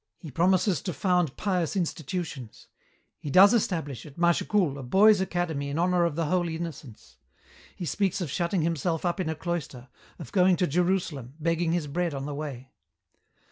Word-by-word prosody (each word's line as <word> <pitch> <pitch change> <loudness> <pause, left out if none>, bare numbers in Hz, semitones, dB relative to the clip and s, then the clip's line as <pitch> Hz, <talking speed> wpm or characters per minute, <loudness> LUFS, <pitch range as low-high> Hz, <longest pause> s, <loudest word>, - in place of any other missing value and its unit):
He 155 - -10
promises 180 - +2
to 180 - -4
found 180 -5 0
pious 180 -5 -1
institutions. 160 - -4 0.5
He 145 - -6
does 195 - +7
establish, 160 - -1
at 145 -3 -13
Mâchecoul, 170 -2 +1
a - - -5
boys' 195 - +5
academy 170 -6 -2
in 140 - -3
honour 175 0 +2
of 165 -4 -1
the 165 0 -1
Holy 170 0 0
Innocents. 135 - -8 0.6
He 175 - -5
speaks 190 +5 0
of 170 -7 -4
shutting 170 +1 0
himself 165 +1 -1
up 175 +2 -1
in 175 -4 -1
a 160 - -2
cloister, 150 -7 -5 0.3
of 160 -8 -10
going 185 -1 +4
to 180 - +1
Jerusalem, 170 -6 -1
begging 165 +1 0
his 170 -3 0
bread 165 +2 -2
on 135 0 -4
the 145 - -4
way. 140 -3 -7
170 Hz, 175 wpm, -27 LUFS, 145-180 Hz, 0.6 s, does